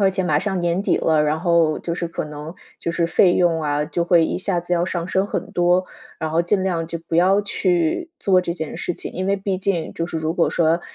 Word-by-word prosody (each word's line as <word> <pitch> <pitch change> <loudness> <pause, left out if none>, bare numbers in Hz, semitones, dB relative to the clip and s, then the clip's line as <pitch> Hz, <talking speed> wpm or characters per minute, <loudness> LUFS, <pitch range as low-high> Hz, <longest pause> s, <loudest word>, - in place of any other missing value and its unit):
而 195 -1 +4
且 190 0 -1
马 150 -4 +2
上 190 +1 -2
年 175 +2 0
底 - - +1
了， 155 -2 +2
然 150 +1 +1
后 170 -3 +2
就 170 - -4
是 170 -1 -3
可 165 - -4
能 150 +2 -8 0.3
就 170 - -2
是 170 0 0
费 175 +2 +4
用 170 -2 +2
啊， 150 0 0
就 170 +2 -2
会 170 -1 +4
一 - - -2
下 185 -1 0
子 175 +1 -4
要 170 -1 +2
上 170 -2 -3
升 190 +1 0
很 - - -4
多， 175 +1 +3 0.3
然 160 -1 -3
后 165 +2 +2
尽 185 +2 +1
量 170 -4 -1
就 170 0 -5
不 165 - -1
要 190 +4 +4
去 185 - 0
做 185 -2 +3
这 170 -1 -3
件 160 -3 -5
事 175 - -2
情。” - - -6
因 185 +1 -3
为 200 +1 +2
毕 195 -1 -2
竟 190 -4 -1
就 165 - -3
是 170 - -5
如 160 0 -1
果 170 0 +2
说 165 +1 +2
170 Hz, 275 characters per minute, -21 LUFS, 165-185 Hz, 0.3 s, 而